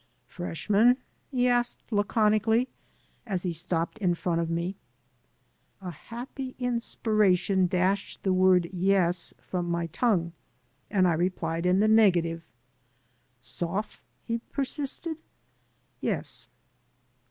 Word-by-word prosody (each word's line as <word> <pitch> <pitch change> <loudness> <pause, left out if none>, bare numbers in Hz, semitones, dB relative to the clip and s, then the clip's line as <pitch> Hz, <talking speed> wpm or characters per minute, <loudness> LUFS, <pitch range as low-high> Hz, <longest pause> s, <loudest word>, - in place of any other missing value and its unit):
" - - -42
Freshman? 205 +7 +2
'^ - - -26 0.3
he 250 -2 +1
asked, 240 -1 +1
laconically, 215 +3 +2 0.6
as 190 -4 -2
he 180 - -1
stopped 170 +4 -2
in 180 -4 +2
front 170 -1 -1
of 165 - -2
me. 170 +3 -2 1.0
A 185 -2 -6
happy 255 - -8
inspiration 215 -6 +1
dashed 185 +3 0
the 190 - +2
word 185 -2 +4
"yes" 180 -2 +2
from 175 -2 -3
oflf - - -2
my 170 0 0
tongue, 170 -1 0 0.6
and 190 -3 +3
I 175 - +3
replied 170 0 -1
in 185 +2 +4
the 215 - +4
negative. 175 -7 +4 1.0
"Soph?" 185 +5 -4 0.2
he 230 0 -2
persisted. 285 +5 -4 0.8
"Yes." - - -2
190 Hz, 120 wpm, -27 LUFS, 175-225 Hz, 1.0 s, word